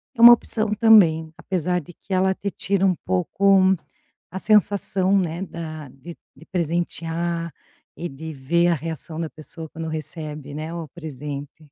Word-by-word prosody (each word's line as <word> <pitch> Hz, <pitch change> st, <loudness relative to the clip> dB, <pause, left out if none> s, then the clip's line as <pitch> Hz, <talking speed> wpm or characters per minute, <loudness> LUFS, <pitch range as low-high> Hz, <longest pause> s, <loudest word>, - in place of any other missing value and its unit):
é 230 Hz, -, -2 dB
uma 240 Hz, 0 st, +12 dB
opção 220 Hz, -2 st, 0 dB
também, 165 Hz, -9 st, +5 dB
apesar 180 Hz, -1 st, -1 dB
de 170 Hz, +4 st, -14 dB
que 190 Hz, -, -8 dB
ela 190 Hz, +1 st, +3 dB
te 200 Hz, -1 st, -4 dB
tira 195 Hz, 0 st, 0 dB
um 185 Hz, -2 st, +3 dB
pouco 190 Hz, +1 st, +3 dB, 0.6 s
a 190 Hz, -, -5 dB
sensação, 200 Hz, -2 st, +3 dB
né, 175 Hz, 0 st, -2 dB
da 155 Hz, -5 st, -7 dB
de 150 Hz, +7 st, -11 dB, 0.2 s
de 165 Hz, -, -16 dB
presentear 170 Hz, -1 st, -2 dB, 0.5 s
e 175 Hz, -, -3 dB
de 160 Hz, +4 st, -8 dB
ver 170 Hz, +6 st, +1 dB
a 170 Hz, -, +3 dB
reação 160 Hz, +1 st, -6 dB
da 160 Hz, -, -3 dB
pessoa 160 Hz, +1 st, -9 dB
quando 165 Hz, 0 st, -6 dB
recebe, 155 Hz, -2 st, -4 dB
né, 155 Hz, +2 st, -5 dB
o 165 Hz, -2 st, -5 dB
presente. 150 Hz, -2 st, -8 dB
170 Hz, 160 wpm, -23 LUFS, 155-190 Hz, 0.6 s, uma